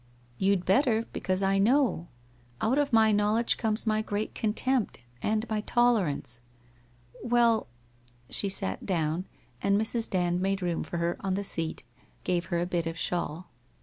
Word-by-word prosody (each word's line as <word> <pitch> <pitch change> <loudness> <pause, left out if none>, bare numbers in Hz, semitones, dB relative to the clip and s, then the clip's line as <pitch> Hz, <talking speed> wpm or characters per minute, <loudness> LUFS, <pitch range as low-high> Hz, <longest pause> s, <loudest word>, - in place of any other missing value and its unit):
1 120 - -31 0.3
You'd 190 -2 +2
better, 230 +1 +3
because 185 +1 -1
I 195 0 +2
know. 235 - +2 0.5
Out 255 +6 +2
of 285 -1 +1
my 220 -2 +5
knowledge 210 +3 +2
comes 220 0 0
my 215 -1 +2
great 215 0 -3
contempt, 225 - -1 0.2
and 220 +2 0
my 215 -1 -1
tolerance. 205 - +1 0.8
Well 235 -2 +3 0.3
' - - -35 0.3
She 200 - +2
sat 95 - -2
down, 165 -1 -1 0.4
and 200 0 +3
Mrs. 225 +1 0
Dand 180 -1 0
made 195 0 0
room 175 -2 -1
for 175 - -5
her 170 +1 -1
on 190 -1 -1
the 200 - -2
seat, 165 -4 -3 0.4
gave 175 -1 0
her 175 -2 -1
a 175 - 0
bit 175 -2 -1
of 165 0 -4
shawl. 175 0 -3
200 Hz, 165 wpm, -28 LUFS, 175-220 Hz, 0.8 s, my